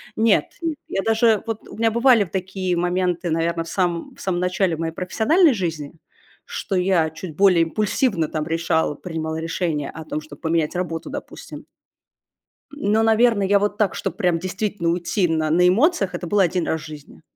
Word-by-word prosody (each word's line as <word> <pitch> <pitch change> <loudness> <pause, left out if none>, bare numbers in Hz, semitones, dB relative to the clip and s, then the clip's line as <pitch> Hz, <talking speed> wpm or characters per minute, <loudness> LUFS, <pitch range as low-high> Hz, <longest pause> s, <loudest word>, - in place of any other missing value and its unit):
Нет-нет, 285 +8 +1
я 195 - -2
даже, 225 -1 +3
вот 225 -2 -5
у - - -11
меня 225 0 +2
бывали 235 -1 +4
такие 185 0 -3
моменты, 175 0 0
наверно, 165 +1 0
в 165 - -12
самом 175 -3 -2
в - - -14
самом 180 -2 -1
начале 180 -1 0
моей 160 0 -3
профессиональной 265 - +3
жизни, 165 -8 -4 0.5
что 195 - -4
я 180 -3 +2
чуть 160 0 -8
более 185 -2 +5
импульсивно 195 - 0
там 155 0 -3
решала, 165 -2 0
принимала 160 -1 -4
решение 165 -3 -2
о 160 - -8
том, 155 - -4
чтобы 150 -2 -13
поменять 160 -1 0
работу, 170 -2 -3
допустим. - - -8 1.1
Ну, 220 -6 +1
наверно, 225 -2 +3
я 200 +1 +3
вот 205 0 -1
так, 210 -3 +1
чтобы - - -3
прям 180 -5 +1
действительно 190 0 -2
уйти 175 +2 0
на 160 -1 0
на 180 +3 +4
эмоциях, 210 - +2
это - - -5
было 200 +1 +3
1 175 -1 0
раз 160 -1 -1
в - - -10
жизни. 150 -2 -12
180 Hz, 175 wpm, -22 LUFS, 165-205 Hz, 1.1 s, более